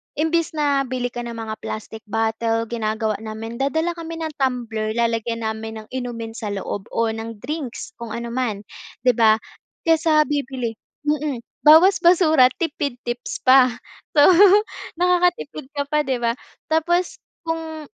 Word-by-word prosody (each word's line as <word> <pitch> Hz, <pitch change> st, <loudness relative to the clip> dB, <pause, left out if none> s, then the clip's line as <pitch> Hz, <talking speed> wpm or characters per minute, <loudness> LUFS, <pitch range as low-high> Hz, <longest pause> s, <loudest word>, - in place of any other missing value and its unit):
imbes 320 Hz, +1 st, 0 dB
na 280 Hz, -3 st, +1 dB
bili 245 Hz, -1 st, -2 dB
ka 240 Hz, -, -6 dB
ng 235 Hz, -, -6 dB
mga 220 Hz, -1 st, -5 dB
plastic 220 Hz, 0 st, -6 dB
bottle, 225 Hz, +1 st, 0 dB
ginagawa 220 Hz, -2 st, -1 dB
namin 225 Hz, +1 st, -7 dB
dadala 320 Hz, +5 st, 0 dB
kami 330 Hz, 0 st, -6 dB
ng 315 Hz, -, -3 dB
tumbler, 230 Hz, -4 st, -1 dB
lalagyan 230 Hz, 0 st, -1 dB
namin 220 Hz, 0 st, -4 dB
ng -, -, -21 dB
inumin 240 Hz, -3 st, -5 dB
sa 225 Hz, -1 st, -6 dB
loob 195 Hz, +1 st, -5 dB
o 230 Hz, -1 st, +1 dB
ng 225 Hz, 0 st, -6 dB
drinks 285 Hz, -3 st, -5 dB
kung 235 Hz, -2 st, -6 dB
ano 235 Hz, 0 st, -5 dB
man, 235 Hz, -5 st, -2 dB, 0.4 s
'di 250 Hz, -, +5 dB
ba, 220 Hz, -2 st, +5 dB, 0.5 s
kaysa 320 Hz, -2 st, +4 dB
bibili, 265 Hz, -5 st, -2 dB, 0.3 s
mm, 295 Hz, -5 st, -1 dB, 0.2 s
bawas 340 Hz, +6 st, +8 dB
basura 340 Hz, -7 st, +5 dB
tipid 290 Hz, -5 st, -2 dB
tips 240 Hz, 0 st, -5 dB
pa. 260 Hz, 0 st, +7 dB, 0.5 s
So, 290 Hz, -, +6 dB, 0.7 s
nakakatipid 355 Hz, -5 st, +1 dB
ka 285 Hz, -, 0 dB
pa, 300 Hz, +1 st, +1 dB
'di 265 Hz, -, +1 dB
ba? 230 Hz, -, +3 dB, 0.4 s
Tapos 345 Hz, +3 st, +1 dB, 0.2 s
kung 325 Hz, -1 st, -4 dB
250 Hz, 145 wpm, -22 LUFS, 225-310 Hz, 0.7 s, bawas